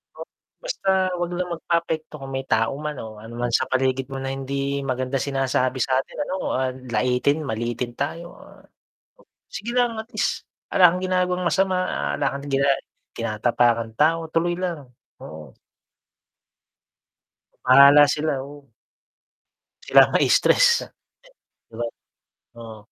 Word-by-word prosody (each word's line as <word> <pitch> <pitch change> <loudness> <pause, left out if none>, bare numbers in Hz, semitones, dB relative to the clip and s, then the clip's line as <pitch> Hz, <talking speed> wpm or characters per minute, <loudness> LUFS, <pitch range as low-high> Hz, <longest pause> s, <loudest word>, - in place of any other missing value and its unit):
O, - - -11 0.4
basta - - -3 0.3
wag 175 0 -1
lang 180 -1 -2
magpaapekto 165 -2 -2
kung 135 0 -7
may 135 0 -3
tao 115 0 +2
man 150 -1 -3
o 110 -1 -10
ano 110 - -11
naman 120 0 -2
sa - - +2
paligid 130 0 0
mo 135 - -4
na 135 0 -3
hindi 140 +1 -3
maganda 130 +1 -2
sinasabi 135 -1 -1
sa'tin 130 0 -1
ano, 185 - -3 0.2
ah, 130 0 0 0.2
laitin, 125 +6 +1
maliitin 120 +2 -3
tayo, 160 +4 -3 0.2
ah, - - -17 0.9
sige 235 +1 -5
lang 240 -2 +1
at 220 - -10
least, - - -1 0.3
ala 180 -2 +7
kang 180 - -4
ginagawang 180 0 0
masama, 190 +1 +1
ah, - - -2
ala 140 -1 0
kang 140 +1 -8
gina 140 +1 +2 0.5
tinatapakang 115 0 0
tao, 165 +2 +2
tuloy 175 +1 +1
lang, 170 -6 -4 0.4
oo. 80 -2 -10 2.1
Bahala 140 +3 +8
sila, 150 -2 -1
oo. 145 0 -13 1.2
Sila - - +7
ang - - -8
ma-stress - - +4 1.0
'di 115 - -14
ba 120 - -1 0.8
oo. 110 -1 -9
140 Hz, 135 wpm, -23 LUFS, 125-165 Hz, 2.1 s, Bahala